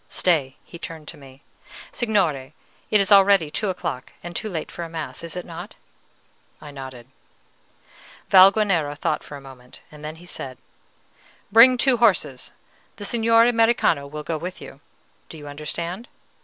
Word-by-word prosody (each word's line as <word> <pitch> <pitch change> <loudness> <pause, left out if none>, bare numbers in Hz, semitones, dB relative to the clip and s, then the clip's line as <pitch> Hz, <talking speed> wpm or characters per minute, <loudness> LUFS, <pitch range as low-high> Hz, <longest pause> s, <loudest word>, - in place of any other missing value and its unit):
"Stay!" 145 -7 +1
He 170 - -12
turned 160 -3 -8
to - - -8
me: 135 0 -16 0.5
"Signore, 165 - -1 0.3
it 210 - +4
is 195 +1 +1
already 195 -5 +6
two 210 +4 -2
o'clock 130 -8 -5
and 175 0 -8
too 215 - -3
late 165 -5 -5
for 170 -1 -6
mass, 155 -5 -6
is 165 -2 -7
it 180 - -5
not?" 165 -1 -9 0.8
I 145 - -11
nodded. 130 -3 -9 1.2
Valguanera 190 -6 +5
thought 150 +1 -3
a 145 - -8
moment, 130 -2 -14
then 150 +1 -8
he 170 +2 -15
said, 130 -6 -7 0.9
"Bring 240 +4 +8
two 255 0 +3
horses; 185 - +1 0.4
the 205 - -7
Signor 230 +1 +4
Americano 225 -11 +2
will 150 +1 -7
go 160 0 -3
with 180 +3 -6
you, 135 - -11 0.5
do 160 - -10
you 145 -1 -10
understand?" 170 - -5
165 Hz, 150 wpm, -23 LUFS, 145-200 Hz, 1.2 s, Bring